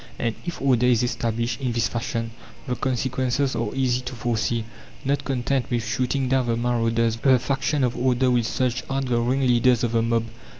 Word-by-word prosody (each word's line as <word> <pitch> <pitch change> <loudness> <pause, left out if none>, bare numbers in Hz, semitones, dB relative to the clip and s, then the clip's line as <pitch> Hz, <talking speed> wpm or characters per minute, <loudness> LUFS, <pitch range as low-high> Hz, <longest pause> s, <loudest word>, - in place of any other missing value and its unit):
And 115 -2 -1
if 175 - -4
"order 125 -3 +3
is 125 -1 +3
established" 115 0 -2
in 125 -3 -1
this 115 -1 +1
fashion, 115 -1 -3 0.3
the 125 - -2
consequences 130 +2 -1
are 115 -2 -1
easy 130 -2 +1
to 125 0 -6
foresee. 115 -1 -1 0.4
Not 140 +1 0
content 130 0 -1
with 120 -3 0
shooting 130 +3 0
down 130 -1 +1
the 115 -1 +1
"marauders," 115 -1 +1
the 130 +2 +4
faction 135 +3 0
of 125 -1 +1
"order" 125 0 +2
will 120 -1 +3
search 125 +2 -1
out 135 0 -1
the 120 -2 +1
"ringleaders 125 -1 +3
of 120 - +1
the 115 -1 +2
mob." 115 0 +1
125 Hz, 185 wpm, -24 LUFS, 115-130 Hz, 0.4 s, the